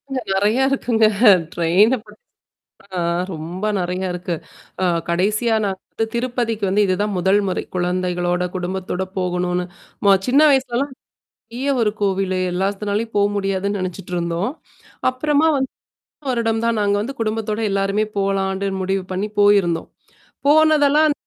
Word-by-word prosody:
அங்க 270 -1 -2
நெறையா 210 +7 +2
இருக்குங்க. 235 -5 +2 0.5
ட்ரெயின 185 +9 +3
ப - - -18 0.9
ஆ - - 0 0.3
ரொம்ப 170 +5 -6
நறைய 180 +1 -2
இருக்கு. 180 0 -3 0.5
அ - - +3 0.2
கடைசியா 210 +7 +1
நான் 195 -2 -2
வந்து 225 - -1
திருப்பதிக்கு 235 -3 -1
வந்து 200 +3 +3
இதுதான் 200 +3 0
முதல் 190 +3 +3
முறை. 185 - -1
குழந்தைகளோட, 180 0 0
குடும்பத்தோட 185 0 -3 0.2
போகணும்னு 180 0 -1 0.4
ம 200 -1 +7
சின்ன 270 +4 +4
வயசுலலாம் 265 0 +1 0.4
நெறைய 260 +4 -4
ஒரு 215 -2 +2
கோவிலு 190 -2 0
எல்லாத்துனாலயும் 205 +4 -2
போ 205 - +4
முடியாதுன்னு 195 0 -1
நெனச்சுட்டுருந்தோம். 180 +1 -3 0.6
அப்புறமா 295 +4 +1
வந்து 265 -1 -1 0.5
போன - - -8
வருடம் 225 -2 0
தான் 230 -1 +1
நாங்க 205 0 +2
வந்து 265 +6 -5
குடும்பத்தோட 215 -1 -2
எல்லாருமே 195 +2 +1
போலான்ட்டு 195 0 0
முடிவு 190 +1 -1
பண்ணி 195 +3 -2
போயிருந்தோம். 200 -5 +3 0.6
போனதெல்லாம் 305 0 +5
200 Hz, 125 wpm, -20 LUFS, 185-230 Hz, 0.9 s, ம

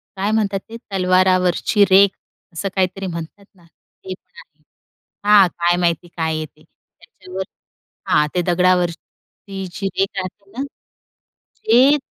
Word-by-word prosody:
काय 195 +2 -1
म्हणतात 205 -3 0
ते 230 - -7
तलवारावरची 185 +1 +3
रेख 195 +1 +7 0.4
असं 195 +4 -3
काहीतरी 190 0 -1
म्हणतात 170 +3 -7
ना. 175 - -23 0.4
तेच 185 0 -6 0.2
आहे. 470 - -17 0.6
हा 205 -1 +7
काय 175 0 0
माहिती 175 -1 0
काय 160 -2 -2
आहे 155 - -3
ते. 150 - -21
त्याच्यावर 185 +1 -11 0.6
हां, 150 - +3
ते 180 - +2
दगडावरची 180 +2 -1
जी 195 +2 -3
रेख 195 - +3
राहते 195 +1 -6
ना. 255 +6 -4 1.0
ते 255 +6 +5
185 Hz, 130 wpm, -19 LUFS, 175-200 Hz, 1.0 s, रेख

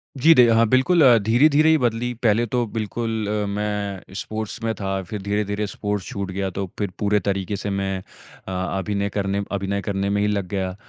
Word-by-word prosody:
जी, 155 +5 +6
दे 125 -5 +6
हाँ, 115 0 +5
बिल्कुल 130 +9 +3 0.2
धीरे-धीरे 145 +8 +4
ही 160 - +5
बदली। 120 -2 -1
पहले 115 +1 +3
तो 120 +1 0
बिल्कुल 115 +1 -3 0.4
मैं 100 -2 -3
स्पोर्ट्स 110 +1 -5
में 115 0 0
था। 95 -1 -2
फिर 105 -2 -4
धीरे-धीरे 105 +1 -1
स्पोर्ट्स 105 -1 -3
छूट 100 -2 -4
गया 95 +1 -2
तो 95 +2 -4
फिर 100 -2 -1
पूरे 105 0 +2
तरीके 100 +1 -2
से 100 +1 -4
मैं 95 -1 -1 0.5
अ, - - -4 0.3
अभिनय 100 +1 -1
करने 100 0 -1
अभिनय 100 0 -2
करने 100 0 -2
में 100 0 +1
ही 105 - +2
लग 100 -3 -1
गया, 95 -1 -3
105 Hz, 185 wpm, -22 LUFS, 100-115 Hz, 0.5 s, जी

